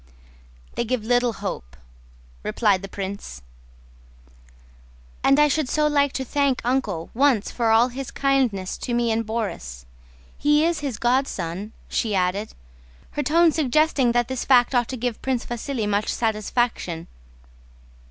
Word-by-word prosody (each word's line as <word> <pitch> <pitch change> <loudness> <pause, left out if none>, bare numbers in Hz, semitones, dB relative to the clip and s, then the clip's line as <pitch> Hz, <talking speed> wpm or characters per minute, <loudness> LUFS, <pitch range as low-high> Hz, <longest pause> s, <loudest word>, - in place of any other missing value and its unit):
"They - - -1
give 235 -1 -2
little 245 0 +2
hope," 130 - -6 0.6
replied 200 - +1
the 195 - -6
prince. 190 - -6 1.8
"And 275 +2 +5
I 300 - +6
should 295 -2 0
so 305 0 +2
like 285 -2 +2
to 265 - -3
thank 280 0 +1
Uncle 220 -10 -1
once 255 -4 +2
for 230 -2 0
all 225 +3 +5
his 265 +1 -6
kindness 255 -9 0
to 240 - -2
me 235 -1 +1
and 225 +1 0
Borís. 200 - -4 0.5
He 295 +2 +3
is 335 -1 0
his 275 -6 -4
godson," 215 -6 -1 0.2
she 215 -3 -1
added, 190 +3 -1 0.6
her 295 - -2
tone 325 +4 +4
suggesting 300 -3 +2
that 240 -1 +2
this 260 -1 -3
fact 250 -1 +4
ought 240 -2 +2
to 260 - -5
give 240 -1 -3
Prince 260 -3 -1
Vasíli 240 -1 -3
much 205 +1 0
satisfaction. 215 -6 -1
240 Hz, 140 wpm, -23 LUFS, 210-270 Hz, 1.8 s, I